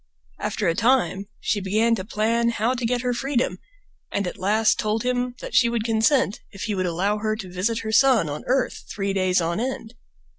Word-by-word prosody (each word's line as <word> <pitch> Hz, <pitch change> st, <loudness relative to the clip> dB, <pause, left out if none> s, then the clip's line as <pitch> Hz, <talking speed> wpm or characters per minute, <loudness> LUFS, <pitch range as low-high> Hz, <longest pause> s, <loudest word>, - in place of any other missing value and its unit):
After -, -, -1 dB
a 165 Hz, -, +3 dB
time 225 Hz, -2 st, +1 dB
she 205 Hz, -, -1 dB
began 215 Hz, +5 st, +2 dB
to 200 Hz, -5 st, -1 dB
plan 230 Hz, +3 st, +1 dB
how 230 Hz, +2 st, 0 dB
to 245 Hz, -2 st, -2 dB
get 245 Hz, 0 st, 0 dB
her 250 Hz, 0 st, 0 dB
freedom, 260 Hz, +1 st, -1 dB, 0.5 s
and 200 Hz, -, -1 dB
at 180 Hz, -, -4 dB
last 215 Hz, +3 st, +2 dB
told 215 Hz, +1 st, 0 dB
him 250 Hz, 0 st, -1 dB
that -, -, -7 dB
she 235 Hz, -, +5 dB
would 235 Hz, -2 st, -1 dB
consent 225 Hz, +1 st, +2 dB
if 195 Hz, -, -8 dB
he 215 Hz, -, -1 dB
would 185 Hz, -2 st, -1 dB
allow 195 Hz, +5 st, 0 dB
her 215 Hz, 0 st, -1 dB
to 190 Hz, -5 st, -8 dB
visit 215 Hz, +5 st, -1 dB
her 220 Hz, -, -4 dB
son 240 Hz, -, +4 dB
on 145 Hz, 0 st, -5 dB
earth 255 Hz, 0 st, 0 dB
three 195 Hz, -1 st, -2 dB
days 185 Hz, -1 st, +2 dB
on 170 Hz, +3 st, -1 dB
end. 245 Hz, -2 st, -4 dB
220 Hz, 210 wpm, -23 LUFS, 195-240 Hz, 0.5 s, she